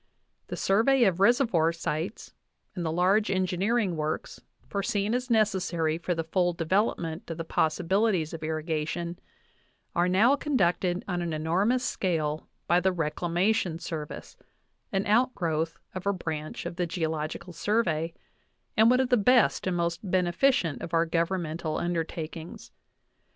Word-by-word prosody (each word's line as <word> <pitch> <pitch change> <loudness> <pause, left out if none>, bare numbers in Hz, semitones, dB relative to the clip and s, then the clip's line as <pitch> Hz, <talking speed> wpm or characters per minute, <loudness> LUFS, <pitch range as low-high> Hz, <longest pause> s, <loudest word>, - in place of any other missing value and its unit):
The - - -5
survey 235 +7 +3
of 190 -5 +2
reservoir 200 -7 +4
sites 165 +4 -4 0.4
and 180 -4 -4
the 160 - -1
large 190 +6 +2
engineering 190 +2 +1
works, 155 0 -3 0.3
foreseen 200 +1 -1
as 250 +1 -1
necessary 180 -8 +1
for 175 0 -1
the 165 - -1
full 175 +2 +1
developmnt 170 -1 -1
of 165 - -4
the 165 - -4
possibili 185 +8 +1
ties 160 -3 -2
of 165 - -6
irrigation, 160 +2 -3 0.8
are 175 +1 +3
now 220 +9 +5
conducted 185 - 0
on 180 -2 -1
an 170 -2 -2
enormous 190 +11 +1
scale 155 -8 -1 0.2
by 175 - +4
the 190 +1 +2
Reclamation 175 +3 0
Service, 160 -3 -7 0.5
an 195 0 0
outgrowth 170 -9 +1 0.2
of 185 +1 -5
a 200 - +3
branch 155 -4 -5
of 170 - -5
the 175 - 0
Geo 165 -2 -1
logical 160 +3 -5
Survey 170 -4 0 0.6
and 220 +1 +6
one 250 +1 +4
of 260 - -1
the 250 - +4
best 240 -2 +3
and 180 -1 0
most 170 0 -1
beneficent 180 - +2
of 165 - -3
our 165 0 +3
governmental 165 -1 -1
undertakings. 165 -1 -4
175 Hz, 145 wpm, -28 LUFS, 165-200 Hz, 0.8 s, and